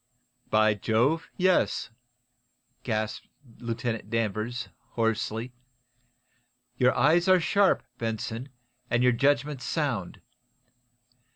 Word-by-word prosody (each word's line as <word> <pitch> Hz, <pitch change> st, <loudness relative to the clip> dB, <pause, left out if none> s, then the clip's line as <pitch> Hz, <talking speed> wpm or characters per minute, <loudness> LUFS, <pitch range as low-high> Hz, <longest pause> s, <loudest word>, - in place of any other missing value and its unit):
"By 110 Hz, 0 st, +4 dB
Jove, 120 Hz, +10 st, +1 dB
yes!" 185 Hz, -9 st, +2 dB, 0.9 s
gasped 110 Hz, -2 st, -3 dB, 0.3 s
Lieutenant 115 Hz, -2 st, -3 dB
Danvers, 115 Hz, +2 st, -2 dB, 0.2 s
hoarsely. 115 Hz, +1 st, -1 dB, 1.2 s
"Your 125 Hz, 0 st, +3 dB
eyes 165 Hz, +7 st, +4 dB
are 185 Hz, -1 st, +6 dB
sharp, 200 Hz, +3 st, +3 dB, 0.2 s
Benson, 115 Hz, +3 st, -3 dB, 0.4 s
and 120 Hz, 0 st, +2 dB
your 125 Hz, -, +5 dB
judgment 140 Hz, +2 st, +1 dB
sound. 130 Hz, -, -2 dB
120 Hz, 85 wpm, -27 LUFS, 110-145 Hz, 1.2 s, are